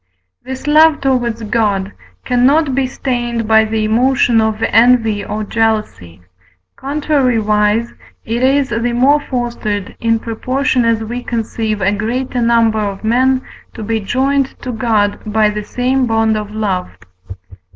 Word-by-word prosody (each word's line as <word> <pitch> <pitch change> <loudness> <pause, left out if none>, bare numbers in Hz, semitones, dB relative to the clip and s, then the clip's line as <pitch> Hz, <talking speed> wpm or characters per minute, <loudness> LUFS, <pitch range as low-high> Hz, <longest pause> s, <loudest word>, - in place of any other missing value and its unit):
This 260 +1 -7
love 310 +1 +5
towards 240 -4 -1
God 205 -3 -1 0.3
cannot 270 +4 +2
be 265 0 0
stained 240 -3 -3
by 220 0 +4
the 220 0 -2
emotion 240 +1 +2
of 220 0 -1
envy 225 -3 +3
or 215 0 -4
jealousy: 215 - -2 0.5
contrariwise, 235 -7 0 0.3
it 230 +2 -2
is 270 +1 +2
the 235 +2 -1
more 270 +5 +3
fostered, 240 -7 -4
in 230 0 +1
proportion 250 +3 -1
as 225 -1 +1
we 240 +3 -5
conceive 220 -2 -3
a 190 +1 +2
greater 245 +4 -2
number 230 -2 +2
of 200 -1 -4
men 255 +3 +2 0.3
to 225 - -6
be 225 +1 -1
joined 270 +6 -1
to 255 - -4
God 220 -3 0
by 215 0 +1
the 210 0 -5
same 255 +3 0
bond 225 -1 +1
of 210 -1 -4
love. 205 - -2
230 Hz, 140 wpm, -15 LUFS, 215-255 Hz, 0.5 s, love